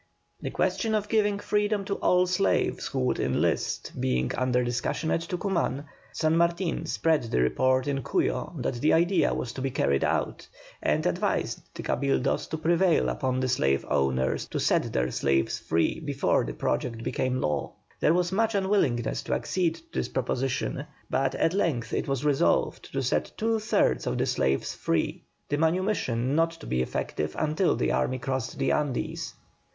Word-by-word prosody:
The -, -, -3 dB
question 220 Hz, -1 st, 0 dB
of 210 Hz, -1 st, -1 dB
giving 210 Hz, -2 st, +2 dB
freedom 205 Hz, 0 st, 0 dB
to 200 Hz, -, -1 dB
all 180 Hz, 0 st, +3 dB
slaves 185 Hz, +2 st, +1 dB
who -, -, -2 dB
would 65 Hz, -, 0 dB
enlist -, -, 0 dB
being 65 Hz, -1 st, +1 dB
under 125 Hz, 0 st, +1 dB
discussion 125 Hz, +6 st, -1 dB
at 165 Hz, -, +1 dB
Tucuman, 170 Hz, -5 st, -1 dB, 0.3 s
San 155 Hz, 0 st, +1 dB
Martin 170 Hz, +1 st, 0 dB
spread 160 Hz, -2 st, +2 dB
the 110 Hz, -, 0 dB
report 130 Hz, -, +2 dB
in 140 Hz, -1 st, -1 dB
Cuyo -, -, -1 dB
that -, -, -1 dB
the 155 Hz, -, +4 dB
idea 170 Hz, -2 st, +3 dB
was 125 Hz, -, -3 dB
to 130 Hz, -, -6 dB
be 135 Hz, -, 0 dB
carried 70 Hz, -, +1 dB
out, -, -, -1 dB, 0.3 s
and -, -, +1 dB
advised -, -, 0 dB
the -, -, -6 dB
Cabildos 140 Hz, -1 st, 0 dB
to 160 Hz, -, -2 dB
prevail 170 Hz, +2 st, +3 dB
upon 130 Hz, -2 st, -1 dB
the 130 Hz, -, 0 dB
slaveowners 70 Hz, -, +1 dB
to -, -, -2 dB
set -, -, +1 dB
their 60 Hz, 0 st, 0 dB
slaves 70 Hz, +1 st, +1 dB
free 80 Hz, 0 st, 0 dB
before 145 Hz, -3 st, +1 dB
the -, -, -4 dB
project 115 Hz, -2 st, -2 dB
became 130 Hz, +1 st, -1 dB
law. 75 Hz, -7 st, -1 dB, 0.3 s
There 160 Hz, -, +3 dB
was 180 Hz, 0 st, +1 dB
much 225 Hz, +2 st, +1 dB
unwillingness 190 Hz, -, +1 dB
to -, -, 0 dB
accede 175 Hz, -3 st, 0 dB
to 165 Hz, -, -15 dB, 0.2 s
this -, -, -2 dB
proposition, 130 Hz, +2 st, -2 dB, 0.2 s
but 135 Hz, 0 st, +1 dB
at 165 Hz, -, +1 dB
length 155 Hz, -, 0 dB
it -, -, -1 dB
was 135 Hz, 0 st, -1 dB
resolved 145 Hz, -2 st, +1 dB
to 135 Hz, 0 st, -1 dB
set 125 Hz, -, 0 dB
two 225 Hz, 0 st, +1 dB
thirds 135 Hz, -, +1 dB
of -, -, 0 dB
the -, -, +1 dB
slaves 65 Hz, 0 st, 0 dB
free, 80 Hz, -, -1 dB, 0.3 s
the 145 Hz, -, -1 dB
manumission 160 Hz, -, +1 dB
not 165 Hz, +1 st, +3 dB
to 165 Hz, -3 st, -12 dB
be 65 Hz, -, 0 dB
effective 75 Hz, +4 st, -3 dB
until 155 Hz, +4 st, +1 dB
the -, -, 0 dB
army 130 Hz, -, 0 dB
crossed 130 Hz, -1 st, -3 dB
the -, -, +1 dB
Andes. 145 Hz, -4 st, -2 dB
140 Hz, 170 wpm, -27 LUFS, 120-175 Hz, 0.3 s, the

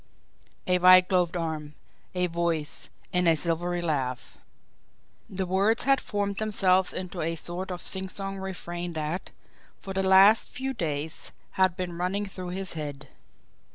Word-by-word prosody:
A 180 Hz, 0 st, +2 dB
white 185 Hz, 0 st, +7 dB
gloved 180 Hz, -2 st, +1 dB
arm, 155 Hz, -3 st, -4 dB, 0.4 s
a 180 Hz, 0 st, +1 dB
voice, 170 Hz, -3 st, -1 dB, 0.2 s
and 180 Hz, -1 st, +2 dB
a 165 Hz, -, +5 dB
silvery 175 Hz, +2 st, -1 dB
laugh! 130 Hz, -6 st, -3 dB, 0.9 s
The 190 Hz, 0 st, -2 dB
words 195 Hz, +5 st, +2 dB
had 275 Hz, 0 st, +3 dB
formed 200 Hz, -1 st, -2 dB
themselves 190 Hz, -4 st, +3 dB
into 185 Hz, -1 st, -5 dB
a 165 Hz, +1 st, -1 dB
sort 175 Hz, +4 st, -4 dB
of 180 Hz, -1 st, -5 dB
singsong 195 Hz, +1 st, -1 dB
refrain 175 Hz, -2 st, -5 dB
that, 155 Hz, +3 st, -3 dB, 0.5 s
for 195 Hz, -, -7 dB
the 190 Hz, -, +1 dB
last 195 Hz, +3 st, +6 dB
few 265 Hz, +1 st, -4 dB
days, 155 Hz, -, -3 dB, 0.2 s
had 185 Hz, -1 st, +2 dB
been 175 Hz, -2 st, -4 dB
running 195 Hz, +3 st, -1 dB
through 185 Hz, -2 st, -7 dB
his 190 Hz, +1 st, -2 dB
head. 145 Hz, -3 st, -6 dB
180 Hz, 145 wpm, -27 LUFS, 165-190 Hz, 0.9 s, white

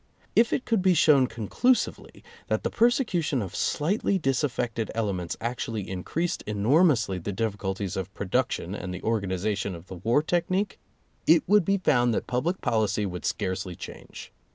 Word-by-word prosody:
If 230 Hz, +1 st, +4 dB
it 260 Hz, -, -1 dB
could 225 Hz, -4 st, +1 dB
be 185 Hz, -1 st, +4 dB
shown 145 Hz, -4 st, +5 dB
conclusively 180 Hz, -, 0 dB, 0.2 s
that -, -, -1 dB
the -, -, -1 dB
persecution 220 Hz, -, +2 dB
of 100 Hz, -4 st, -5 dB
slightly 195 Hz, +5 st, 0 dB
disaffected 130 Hz, -6 st, -1 dB
ele 110 Hz, -3 st, 0 dB
ments 90 Hz, -2 st, -4 dB
actually 115 Hz, -3 st, -3 dB
increased 160 Hz, -, -2 dB
enormously 110 Hz, -, +3 dB
the 90 Hz, -, -4 dB
difficul 100 Hz, -2 st, -2 dB
ties 100 Hz, -2 st, -4 dB
of 95 Hz, 0 st, -4 dB
production 100 Hz, -3 st, -1 dB
and 95 Hz, -3 st, -5 dB
the 90 Hz, -, -7 dB
organization 100 Hz, -2 st, -1 dB
of 85 Hz, +1 st, -11 dB
the 95 Hz, -, -7 dB
war 115 Hz, -, +2 dB
technique, 185 Hz, +5 st, 0 dB, 0.5 s
it 165 Hz, +1 st, +6 dB
would 205 Hz, +1 st, +5 dB
be 195 Hz, +2 st, +2 dB
found 120 Hz, -, +2 dB
that -, -, -2 dB
public 160 Hz, +10 st, -1 dB
policy 105 Hz, -2 st, +1 dB
would 90 Hz, -2 st, -5 dB
scarcely 95 Hz, -3 st, -2 dB
change. -, -, -10 dB
115 Hz, 160 wpm, -26 LUFS, -, 0.5 s, it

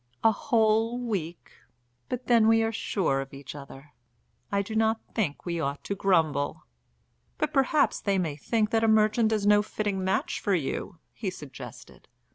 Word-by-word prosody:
"A 225 Hz, -, +6 dB
whole 225 Hz, +1 st, +2 dB
week! 190 Hz, -9 st, -4 dB, 0.6 s
But 250 Hz, 0 st, -4 dB
then 230 Hz, -2 st, +5 dB
we 225 Hz, 0 st, +5 dB
are 225 Hz, -, 0 dB
sure 180 Hz, -10 st, 0 dB
of 135 Hz, 0 st, -9 dB
each 135 Hz, -1 st, -9 dB
other. 140 Hz, 0 st, -11 dB, 0.6 s
I 200 Hz, 0 st, +1 dB
do 220 Hz, +2 st, -6 dB
not 220 Hz, 0 st, +2 dB
think 180 Hz, -11 st, -2 dB
we 170 Hz, -1 st, -2 dB
ought 140 Hz, -2 st, -3 dB
to -, -, -2 dB
grumble." 160 Hz, -6 st, +1 dB, 0.7 s
"But 305 Hz, 0 st, -1 dB
perhaps 280 Hz, +1 st, +2 dB
they 200 Hz, -2 st, +1 dB
may 165 Hz, -6 st, -1 dB
think 215 Hz, +8 st, 0 dB
that 225 Hz, 0 st, +2 dB
a -, -, +4 dB
merchant 220 Hz, +1 st, +3 dB
is 215 Hz, -2 st, 0 dB
no 205 Hz, 0 st, +6 dB
fitting 205 Hz, -2 st, -2 dB
match 190 Hz, -, 0 dB
for 200 Hz, -, +1 dB
you," 170 Hz, +4 st, -3 dB, 0.2 s
he 205 Hz, -, -3 dB
suggested. 150 Hz, -7 st, -11 dB
205 Hz, 170 wpm, -27 LUFS, 160-225 Hz, 0.7 s, A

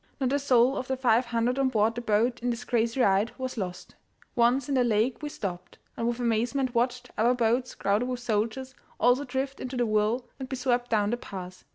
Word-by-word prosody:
Not 265 Hz, -1 st, 0 dB
a 285 Hz, -, +2 dB
soul 260 Hz, -1 st, +3 dB
of 255 Hz, -, -4 dB
the 265 Hz, -, -1 dB
five 245 Hz, -1 st, +3 dB
hundred 235 Hz, +2 st, 0 dB
on 270 Hz, -1 st, +3 dB
board 220 Hz, -2 st, +2 dB
the 240 Hz, -, -5 dB
boat 235 Hz, +2 st, +1 dB
in 245 Hz, -, -1 dB
this 235 Hz, 0 st, -3 dB
crazy 235 Hz, +1 st, 0 dB
ride 200 Hz, -1 st, +3 dB
was 260 Hz, -1 st, -4 dB
lost. 180 Hz, -5 st, -5 dB, 0.4 s
Once 245 Hz, +2 st, +3 dB
in 285 Hz, -, -1 dB
the 255 Hz, -2 st, +3 dB
lake 230 Hz, +2 st, +1 dB
we 300 Hz, -, -4 dB
stopped, 180 Hz, -8 st, -6 dB, 0.2 s
and 230 Hz, -, -2 dB
with 240 Hz, 0 st, -1 dB
amazement 245 Hz, +3 st, 0 dB
watched 245 Hz, +1 st, -1 dB
other 240 Hz, +3 st, +4 dB
boats, 245 Hz, +1 st, 0 dB
crowded 205 Hz, +5 st, 0 dB
with 250 Hz, -1 st, -3 dB
soldiers, 240 Hz, +3 st, -2 dB, 0.3 s
also 245 Hz, +4 st, +4 dB
drift 265 Hz, +1 st, -3 dB
into 255 Hz, 0 st, -5 dB
the 240 Hz, -, +2 dB
whirl 215 Hz, +3 st, +1 dB
and 260 Hz, -1 st, -6 dB
be 265 Hz, -, -2 dB
swept 245 Hz, -1 st, 0 dB
down 210 Hz, -2 st, +2 dB
the 240 Hz, -, 0 dB
pass. 185 Hz, -5 st, -9 dB
240 Hz, 220 wpm, -27 LUFS, 225-255 Hz, 0.4 s, other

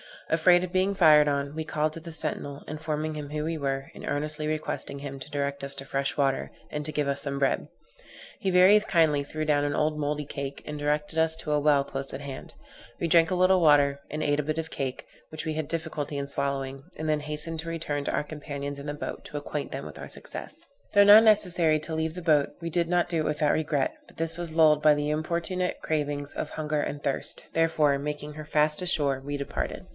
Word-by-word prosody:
Afraid 175 Hz, +2 st, +5 dB
of 180 Hz, -, -4 dB
being 190 Hz, +2 st, +1 dB
fired 155 Hz, -5 st, +6 dB
on, 140 Hz, 0 st, -1 dB
we 160 Hz, 0 st, -4 dB
called 155 Hz, -1 st, 0 dB
to 165 Hz, -, -8 dB
the 165 Hz, 0 st, -9 dB
sentinel, 145 Hz, -2 st, -4 dB
informing 155 Hz, 0 st, -3 dB
him 145 Hz, -1 st, -6 dB
who 150 Hz, 0 st, -2 dB
we 165 Hz, +1 st, -2 dB
were, 135 Hz, -1 st, -3 dB
and -, -, -9 dB
earnestly 150 Hz, +1 st, -2 dB
requesting 155 Hz, -2 st, -3 dB
him 140 Hz, -1 st, -7 dB
to 130 Hz, -, -9 dB
direct 140 Hz, -1 st, -2 dB
us 140 Hz, 0 st, -3 dB
to 135 Hz, -, -1 dB
fresh 140 Hz, 0 st, -1 dB
water, 135 Hz, -2 st, 0 dB, 0.2 s
and 150 Hz, 0 st, -4 dB
to 155 Hz, -, -2 dB
give 150 Hz, -, 0 dB
us 140 Hz, 0 st, -1 dB
some 140 Hz, -1 st, -3 dB
bread. 135 Hz, -1 st, +1 dB, 0.7 s
He 195 Hz, -, -1 dB
very 185 Hz, +3 st, +7 dB
kindly 160 Hz, -8 st, +2 dB
threw 155 Hz, +2 st, -4 dB
down 145 Hz, -1 st, +2 dB
an 145 Hz, 0 st, -1 dB
old 150 Hz, 0 st, 0 dB
mouldy 150 Hz, 0 st, -1 dB
cake, 140 Hz, 0 st, -6 dB
and 150 Hz, 0 st, -5 dB
directed 150 Hz, +2 st, -1 dB
us 160 Hz, 0 st, +2 dB
to 160 Hz, -1 st, -5 dB
a 150 Hz, -, +3 dB
well 145 Hz, -1 st, +4 dB
close 135 Hz, 0 st, -5 dB
at 135 Hz, -, -5 dB
hand. 140 Hz, -2 st, -8 dB, 0.5 s
We 170 Hz, -, -1 dB
drank 165 Hz, 0 st, +5 dB
a 185 Hz, -, 0 dB
little 185 Hz, +1 st, +4 dB
water, 145 Hz, -3 st, +4 dB
and 150 Hz, +1 st, -3 dB
ate 145 Hz, 0 st, +1 dB
a -, -, +1 dB
bit 155 Hz, +2 st, -2 dB
of 160 Hz, 0 st, -2 dB
the -, -, -10 dB
cake, 135 Hz, -2 st, -3 dB, 0.2 s
which 155 Hz, -, -6 dB
we 155 Hz, -1 st, -2 dB
had 155 Hz, -2 st, -2 dB
difficulty 150 Hz, -3 st, -3 dB
in 140 Hz, 0 st, -2 dB
swallowing, 135 Hz, -1 st, -3 dB
and 155 Hz, 0 st, -3 dB
then 155 Hz, -1 st, +2 dB
hastened 150 Hz, +2 st, -3 dB
to 165 Hz, +1 st, -4 dB
return 150 Hz, -3 st, -3 dB
to -, -, -1 dB
our -, -, 0 dB
companions 145 Hz, -2 st, -6 dB
in 140 Hz, -, -8 dB
the 145 Hz, -, -3 dB
boat, 150 Hz, -, -6 dB
to 150 Hz, -, -6 dB
acquaint 145 Hz, 0 st, -4 dB
them -, -, -5 dB
with -, -, -9 dB
our -, -, -7 dB
success. -, -, -8 dB, 0.3 s
Though 205 Hz, -1 st, +7 dB
now 205 Hz, +1 st, +10 dB
necessary 180 Hz, -8 st, +5 dB
to 160 Hz, +1 st, -6 dB
leave 160 Hz, 0 st, -1 dB
the 180 Hz, -, -5 dB
boat, 155 Hz, -4 st, +2 dB
we 165 Hz, -, -3 dB
did 170 Hz, 0 st, 0 dB
not 175 Hz, 0 st, +1 dB
do 165 Hz, -, 0 dB
it 155 Hz, -, 0 dB
without 150 Hz, 0 st, +1 dB
regret; 150 Hz, -3 st, 0 dB
but -, -, -19 dB
this 165 Hz, 0 st, -3 dB
was 170 Hz, -2 st, -4 dB
lulled 155 Hz, -2 st, +5 dB
by 150 Hz, 0 st, +6 dB
the 145 Hz, 0 st, -1 dB
importunate 170 Hz, +4 st, -2 dB
cravings 145 Hz, -2 st, -2 dB
of -, -, -4 dB
hunger 155 Hz, -1 st, -2 dB
and 145 Hz, 0 st, -3 dB
thirst; 140 Hz, -, -2 dB
therefore, 155 Hz, -4 st, +2 dB
making 150 Hz, +1 st, -5 dB
her 155 Hz, 0 st, -7 dB
fast 150 Hz, +2 st, +2 dB
ashore, 145 Hz, -6 st, +1 dB
we 145 Hz, +1 st, -4 dB
departed. 140 Hz, -1 st, -4 dB
150 Hz, 235 wpm, -27 LUFS, 145-160 Hz, 0.7 s, now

